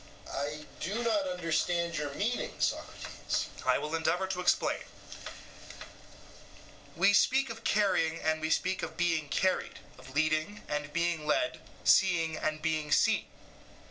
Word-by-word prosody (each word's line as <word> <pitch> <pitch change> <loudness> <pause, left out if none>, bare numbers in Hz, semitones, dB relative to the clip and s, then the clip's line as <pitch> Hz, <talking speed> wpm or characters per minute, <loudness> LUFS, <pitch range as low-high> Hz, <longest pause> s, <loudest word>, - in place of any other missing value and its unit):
EUTHYPHRO: - - -4
I 150 +1 -4
do 210 +8 -2
not 210 -4 +1
understand 170 -1 0
your 150 -2 -2
meaning, 230 +4 -2
Socrates. - - -2 0.2
SOCRATES: - - +1 0.2
I - - +5
will 150 +1 -4
endeavour 165 +3 +1
to 190 -1 -3
explain: 180 - +1 2.1
we, 200 +1 +4
speak 265 +4 +3
of 225 0 -9
carrying 185 -6 +2
and 155 0 0
we 155 - -1
speak 185 +3 +1
of - - -5
being 165 -4 +1
carried, 185 +5 0 0.2
of 130 +1 -13
leading 155 +6 0
and 150 0 -3
being 170 -1 -1
led, 315 - +1 0.2
seeing 165 -5 +4
and 155 0 -2
being 155 -2 -1
seen. - - +3
165 Hz, 140 wpm, -31 LUFS, 155-190 Hz, 2.1 s, I